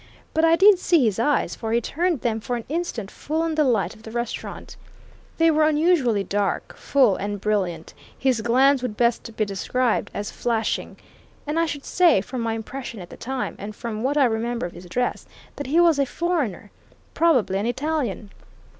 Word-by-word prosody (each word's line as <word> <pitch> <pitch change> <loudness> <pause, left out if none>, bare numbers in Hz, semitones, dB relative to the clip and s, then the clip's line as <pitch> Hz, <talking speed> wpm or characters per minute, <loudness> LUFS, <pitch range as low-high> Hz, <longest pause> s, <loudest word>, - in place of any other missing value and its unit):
But 320 - +1
I 330 0 +6
did 390 +1 +6
see 335 -8 +3
his 215 -2 0
eyes, 290 +5 +1
for 225 -1 -5
he 235 - +4
turned 330 +5 -1
them 225 -2 0
for 245 +3 -3
an 235 - -4
instant 295 - -3
full 315 +2 -2
on 330 -1 -1
the 310 -1 +3
light 215 - +1
of - - -17
the 225 - -10
restaurant. 235 +1 -5 0.6
They 330 0 +5
were 310 0 +3
unusually 300 - +2
dark, 200 0 -2
full 255 -8 +3
and 205 +1 -3
brilliant 185 -6 -2 0.2
his 255 -4 +1
glance 260 +4 +4
would 235 -5 -4
best 235 -1 0
be 215 - +2
described 220 +5 -1
as 205 0 -5
flashing. 230 -2 -2 0.5
And 300 +2 -1
I 335 - +2
should 290 -2 -5
say, 345 - +4
from 245 +6 -5
my 225 -1 -1
impression 235 0 -6
at 175 -1 -10
the - - -9
time, 265 +1 -4
and 205 +1 -7
from 220 -1 -5
what 275 +4 0
I 280 - +5
remember 235 0 -1
of 175 - -5
his 175 +1 -11
dress, 245 +7 -2 0.3
that 285 - -5
he 310 +5 +3
was 335 -4 +5
a 275 - +2
foreigner 290 - -2 0.4
probably 255 - +2
an 210 - -1
Italian." 250 -6 -2
245 Hz, 195 wpm, -23 LUFS, 215-300 Hz, 0.6 s, I